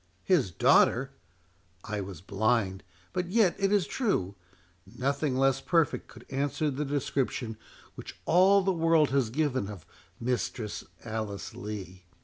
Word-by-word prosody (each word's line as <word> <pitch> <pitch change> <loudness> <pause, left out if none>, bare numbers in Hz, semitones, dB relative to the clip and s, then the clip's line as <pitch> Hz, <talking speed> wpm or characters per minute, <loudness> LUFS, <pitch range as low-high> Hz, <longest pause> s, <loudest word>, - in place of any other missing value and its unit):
"His 160 - +3
daughter!—I 90 -3 0
was 95 -4 -8
blind—but 100 - -2
yet 195 -2 +3
it 195 0 +2
is 205 -4 +3
true, 145 - -1 0.6
nothing 140 +1 0
less 135 0 +3
perfect 165 -3 +1
could - - -14
answer 145 +2 0
the 145 +3 -2
description 135 -4 -2 0.4
which - - -10
all 190 +3 +5
the 190 0 +2
world 165 -3 +3
has 135 -5 +2
given 130 -4 0
of 100 -6 -9 0.3
Mistress 120 -3 -2 0.2
Alice 110 -3 -4
Lee. 95 -3 -7
130 Hz, 125 wpm, -29 LUFS, 100-155 Hz, 0.6 s, all